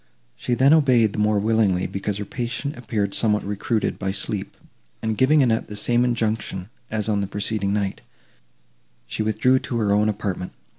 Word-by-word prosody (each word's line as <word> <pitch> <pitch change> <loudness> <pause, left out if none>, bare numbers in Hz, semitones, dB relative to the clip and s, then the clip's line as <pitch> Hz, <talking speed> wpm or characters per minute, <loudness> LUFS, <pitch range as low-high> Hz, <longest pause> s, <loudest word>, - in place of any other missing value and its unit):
She 120 - -2
then 135 +4 +5
obeyed, 125 -9 +4
the - - -4
more 105 0 +2
willingly, 105 -3 +2
because 100 +1 -3
her 105 - -4
patient 130 +6 -4
appeared 110 -5 -2
somewhat 105 -2 +2
recruited 105 +2 -1
by 95 - -2
sleep; 95 - -2 0.4
and, 110 -1 -2
giving 140 +5 +4
Annette 115 -3 +1
the 105 - -7
same 120 +4 +2
injunction, 110 -5 -2 0.2
as 110 -1 -1
on 105 -2 +1
the 100 - -2
preceding 100 0 -1
night, 100 -1 -2 1.0
she - - -4
withdrew 110 +5 +2
to 120 - -4
her 105 -3 +1
own 105 +1 +3
apartment. 100 -3 -3
110 Hz, 170 wpm, -23 LUFS, 100-120 Hz, 1.0 s, then